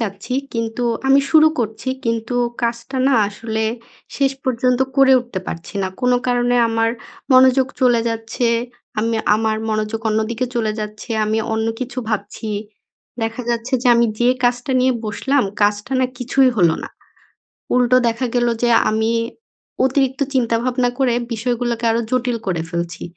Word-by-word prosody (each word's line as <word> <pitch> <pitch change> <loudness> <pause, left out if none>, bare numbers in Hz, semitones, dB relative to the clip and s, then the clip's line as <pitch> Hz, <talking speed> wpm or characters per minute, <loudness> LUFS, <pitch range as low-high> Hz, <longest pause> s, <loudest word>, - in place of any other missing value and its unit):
চাচ্ছি 205 +1 -4 0.2
কিন্তু 230 +1 -3 0.2
আমি 270 +1 +6
শুরু 315 -1 +7
করছি 220 +2 -3 0.2
কিন্তু 230 +1 -2 0.3
কাজটা 235 +3 -2
না 275 - +3
আসলে 220 +1 -3 0.5
শেষ 275 -1 +2
পর্যন্ত 250 -1 +1 0.2
করে 270 -1 +6
উঠতে 240 -6 -6
পারছি 170 +4 -7
না। - - 0
কোনো 250 -1 +3
কারণে 245 0 +1
আমার 225 0 +1 0.4
মনোযোগ 260 0 +6
চলে 245 -2 +4
যাচ্ছে, 225 +1 -2 0.5
আমি 225 +1 0 0.2
আমার 220 0 0
মনোযোগ 215 +1 -2
অন্যদিকে 220 +3 -1
চলে 220 -3 0
যাচ্ছে, 210 +3 -7
আমি 215 +1 0
অন্য 220 0 0
কিছু 255 0 -5
ভাবছি। 215 0 -4 0.7
দেখা 225 +2 -3
যাচ্ছে 235 +2 -3
যে, - - 0
আমি 235 0 +4
যে 240 - +3 0.2
কাজটা 245 +2 +1
নিয়ে 260 +1 +3
বসলাম 260 +6 0 0.2
কাজটা 205 +4 0
না 255 - +3
কিছুই 255 +1 +3
হলো 170 -5 +4
না - - -6 0.9
উল্টো 250 0 +4
দেখা 235 +3 -1
গেলো 240 -1 +2
যে 240 - +3 0.2
আমি 220 +1 +1 0.7
অতিরিক্ত 265 0 0
চিন্তাভাবনা 245 0 +1
করে 260 -3 +2 0.2
বিষয়গুলাকে 235 0 -2
আরও 230 +1 +1
জটিল 250 -1 0
করে 175 -4 0
ফেলছি। 170 0 -4
235 Hz, 150 wpm, -19 LUFS, 220-255 Hz, 0.9 s, শুরু